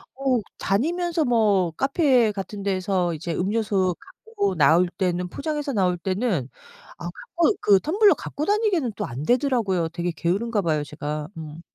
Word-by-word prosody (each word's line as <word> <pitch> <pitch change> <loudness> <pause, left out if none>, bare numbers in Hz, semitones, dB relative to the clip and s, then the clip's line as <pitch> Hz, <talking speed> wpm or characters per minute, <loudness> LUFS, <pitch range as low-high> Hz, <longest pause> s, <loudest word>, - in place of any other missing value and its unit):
어 265 -3 +1 0.2
다니면서 330 - 0
뭐 210 -7 +2
카페 265 - +2
같은 200 +1 -6
데에서 185 -3 0
이제 165 +2 -4
음료수 195 -1 0 0.3
갖고 415 -3 -1
나올 160 +4 +4
때는 180 -1 0
포장해서 295 - -3
나올 180 -4 +1
때는 185 - -1 0.5
아 - - -8
갖고 445 -8 0
그 200 -2 +5
텀블러 400 - +4
갖고 300 +1 -5
다니기에는 405 - +1
또 - - -2
안 125 +5 -6
되더라고요. 235 - +1
되게 175 +1 -3
게으른가 205 +6 0
봐요, 155 -4 0
제가. 150 0 -5
음. 155 +1 -8
200 Hz, 325 characters per minute, -24 LUFS, 175-275 Hz, 0.5 s, 그